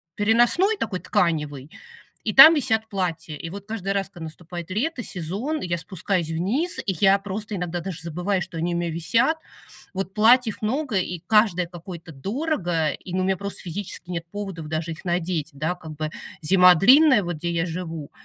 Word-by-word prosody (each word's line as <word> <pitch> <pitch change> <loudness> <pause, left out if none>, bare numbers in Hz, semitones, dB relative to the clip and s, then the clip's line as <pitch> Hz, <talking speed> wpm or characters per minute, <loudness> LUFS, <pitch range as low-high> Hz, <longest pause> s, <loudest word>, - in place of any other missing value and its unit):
переносной, 240 - +3
такой 190 -5 -3
тканевый, 150 -4 -1 0.5
и 215 - -1
там 310 +5 +11
висят 220 -7 0
платья. 175 -6 -3
И 165 - -7
вот 200 +2 -8
каждый 200 -3 -3
раз, 195 -1 -1
когда 170 -4 -9
наступает 170 +2 -8
лето, 250 - -2
сезон, 200 - -3
я 175 -1 -1
спускаюсь 180 -2 -2
вниз, 220 - -1
и 195 - 0
я 195 +3 +4
просто 205 +1 -5
иногда 175 -1 -3
даже 180 -2 -6
забываю, 180 +3 -1
что 170 -2 -8
они 170 +1 -1
у - - 0
меня 170 -1 -2
висят. 230 - +1 0.6
Вот 195 0 -3
платьев 225 +1 +4
много, 250 0 -1
и 180 -1 -3
каждое 210 -5 +3
какое-то 175 -1 -10
дорого, 175 - -1
и, 180 - -9
ну, 185 - +1
у - - 0
меня 190 0 +1
просто 200 0 -5
физически 180 0 -7
нет 170 -1 -4
поводов 195 -6 -6
даже 160 +1 -3
их 160 - -9
надеть, 175 -3 -1
да. 155 +5 -2
Как 160 -3 -10
бы 155 +1 -4 0.3
зима 180 +1 +6
длинная, 260 - +6
вот 175 -2 -4
где 170 +2 -3
я 170 0 0
живу, 165 -3 -6
180 Hz, 185 wpm, -24 LUFS, 165-210 Hz, 0.6 s, там